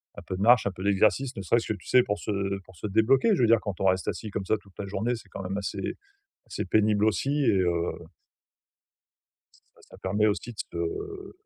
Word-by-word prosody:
un - - -8
peu 95 - -5
de 95 - -5
marche 120 +3 +6
un 100 - -1
peu 95 +1 -9
d'exercice 110 +6 +2
ne - - -3
serait-ce 115 +5 +1
que - - +1
tu 90 - -18
sais? 125 - +6
Pour 105 -2 -2
se, 105 - -4
heu, 100 -1 -1
pour 95 - -17
se 105 - -5
débloquer, 130 - +3
je - - 0
veux 115 - +5
dire 115 -1 +5
quand 100 -4 -5
on - - +1
reste 95 0 +2
assis 110 - -3
comme 100 -1 -3
ça 110 - +2
toute 100 -2 -21
la 100 - -4
journée, 110 +5 -1
c'est 110 -4 -12
quand 95 - -7
même 95 +2 -3
assez 100 0 -3 0.5
assez - - -4
pénible 105 -1 +3
aussi 140 +6 +1
et 95 - +4
heu 90 -1 +2 2.0
Bah, - - -22
ça - - -14
permet 105 +3 +1
aussi 110 +3 -1
de 110 - -20
se 405 -1 -5
105 Hz, 235 wpm, -27 LUFS, 95-120 Hz, 2.0 s, marche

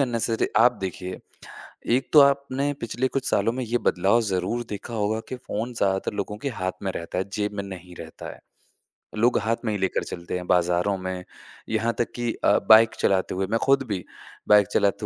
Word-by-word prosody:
Unnecessary 115 -3 0
आप 120 0 +6
देखिए, 90 -1 -5 0.7
एक 125 +3 +1
तो 150 - +9
आपने 140 0 +2
पिछले 120 +2 -1
कुछ 135 0 -2
सालों 105 +3 +2
में 130 +1 -3
ये 120 +2 0
बदलाव 100 +6 +2
ज़रूर 95 +7 -1
देखा 105 +3 -6
होगा 110 0 0
कि 130 - -3
फ़ोन 120 0 -5
ज़्यादातर 95 -2 0
लोगों 105 +1 -4
के 140 +5 -3
हाथ 95 0 0
में 95 - -1
रहता 85 0 -5
है, 95 +2 -2
जेब 105 0 -2
में 100 -1 -4
नहीं 90 -2 -9
रहता - - -9
है। - - -17 0.8
लोग 120 +3 +3
हाथ 115 +1 0
में 110 - 0
ही - - -1
लेकर 95 0 0
चलते 85 +1 -6
हैं 90 - -7
बाज़ारों 90 +2 +2
में। 95 -1 -5 0.5
यहाँ 115 +1 0
तक 120 - 0
कि 120 -1 -1
अ, - - +5
बाइक 110 0 +7
चलाते 95 -1 +1
हुए 95 0 -1
मैं 115 - +2
खुद 135 0 +3
भी, 95 -4 -3 0.4
बाइक 105 -2 +6
चलाते 100 +1 +1
105 Hz, 200 wpm, -25 LUFS, 95-120 Hz, 0.8 s, तो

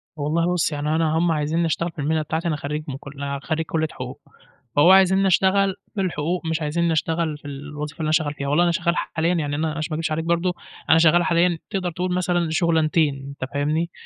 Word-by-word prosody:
والله 165 +4 0
بُص، 170 -2 +1
يعني 150 +1 -1
أنا 160 -1 +1
هم 170 0 +2
عايزينّي 155 +2 0
أشتغل 165 +2 -1
في 160 - -14
المهنة 155 +2 +1
بتاعتي، 160 +3 -2
أنا 155 - 0
خرّيج 150 +1 -4
من 135 -1 -4
كل 140 0 -6
خرّيج 160 +4 -1
كُلّية 160 0 -1
حقوق، - - -8 0.6
فهو 170 +5 +6
عايزينّي 190 0 +5
أشتغل 190 +1 +3 0.2
بالحقوق 175 -2 -2
مش 160 0 -1
عايزينّي 165 +2 0
أشتغل 160 -1 -1
في - - -28
الوظيفة 150 +2 -7
اللي 160 - -2
أنا 155 - +1
شغّال 150 -1 +1
فيها. 140 -1 -4
والله 160 +5 +3
أنا 170 - +2
شغّال 170 0 0
حاليًا 165 +2 0
يعني 145 -3 -1
أنا 160 +1 -1
عشان 155 0 -3
ما - - -2
أكدبش 160 -1 -2
عليك 160 +1 -2
برضه، 170 +1 +1 0.4
أنا 160 - +7
شغّال 170 +1 +5
حاليًا 170 0 +2
تقدر 185 -3 -2
تقول 180 +2 -3
مثلًا 175 -2 0
شُغلانتين 160 -3 +2
أنت 135 -1 -6
فاهمني، 155 +4 0
160 Hz, 215 wpm, -23 LUFS, 150-170 Hz, 0.6 s, أنا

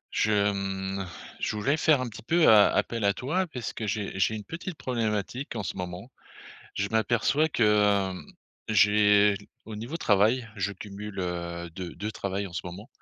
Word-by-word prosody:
Je, 105 -1 +3
mmh, 95 -1 -3 0.3
je - - -2
voulais 120 +8 +1
faire 155 -2 +3
un 130 - -2
petit 110 - -9
peu 165 +8 +3
a 105 -2 +8
appel 115 -2 -1
à 100 0 +3
toi 180 +9 -1
parce 125 -7 -5
que 110 - -4
j'ai 100 -1 -3
j'ai 105 +4 +2
une 105 - -6
petite 165 - -6
problématique 120 0 -2
en 105 - -3
ce - - -4
moment, 90 +6 -6 0.6
je 100 - 0
m'aperçois 120 +7 +2
que, 120 -6 +1
hem, 100 -3 +2 0.4
j'ai 105 0 +5 0.3
au 110 - -8
niveau 115 +9 -5
travail, 110 -1 +2
je 100 -2 -1
cumule, 100 +1 -8
heu, 85 -1 -4
2- 90 +1 -7
2 105 +3 -4
travail 100 -1 -3
en 90 - -11
ce 85 - -3
moment, 90 +5 -8
105 Hz, 180 wpm, -27 LUFS, 95-115 Hz, 0.6 s, a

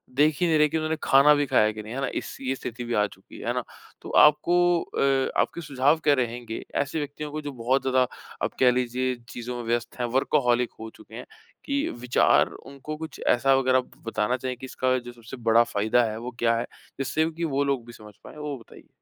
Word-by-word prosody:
देख 150 +1 +3
ही 175 - +4
नहीं 160 - +3
रहे 150 - +5
हैं - - -1
कि - - 0
उन्होंने 155 0 -1
खाना 140 +2 +6
भी 145 0 +1
खाया 110 -5 +3
कि 110 0 -8
नहीं, 110 +2 -8
है 135 - -3
ना? 135 - 0
इस - - -5
ये 135 0 -1
स्थिति 120 -2 -6
भी 120 0 -4
आ 105 -2 +3
चुकी 95 -1 -15
है, - - -7
है - - +1
ना? - - -2 0.4
तो - - -9 0.2
आपको 175 +4 +3
अ, 135 -1 0
आपके 170 - -3
सुझाव 145 +1 +2
क्या 145 - +5
रहेंगे 120 -1 -5
ऐसे 145 +3 -1
व्यक्तियों 150 +1 -5
को 155 +1 -4
जो 145 -1 -5
बहुत 130 +1 0
ज़्यादा 130 -1 +2 0.4
आप - - -1
कह 125 -1 +6
लीजिए 125 +1 -1
चीज़ों 120 +1 -6
में 120 - -5
व्यस्त 120 +1 -2
हैं 120 - 0
वर्कहॉलिक 125 -3 +2
हो 110 0 -7
चुके - - -14
हैं - - -7 0.4
कि 280 +1 0
विचार 125 +1 +3
उनको 140 +2 -9
कुछ 160 -1 -8
ऐसा 135 +3 +4
वग़ैरह 130 -1 +3 0.3
बताना 115 +2 0
चाहिए 130 0 -4
कि 130 - -8
इसका 130 0 0
जो 120 -1 -7
सबसे 120 +2 -11 0.2
बड़ा 120 - +8
फ़ायदा 110 +3 +1
है 110 -1 -2
वो 120 +2 -6
क्या 115 0 +3
है? 115 - -2 0.3
जिससे 155 +4 0
कि 165 +1 -6
वो 140 -3 +1
लोग 135 -4 -1
भी 120 - -11
समझ 105 -2 -13
पाएँ, - - -12
वो 150 -2 -4
बताइए? 115 - -16
130 Hz, 235 wpm, -25 LUFS, 120-145 Hz, 0.4 s, बड़ा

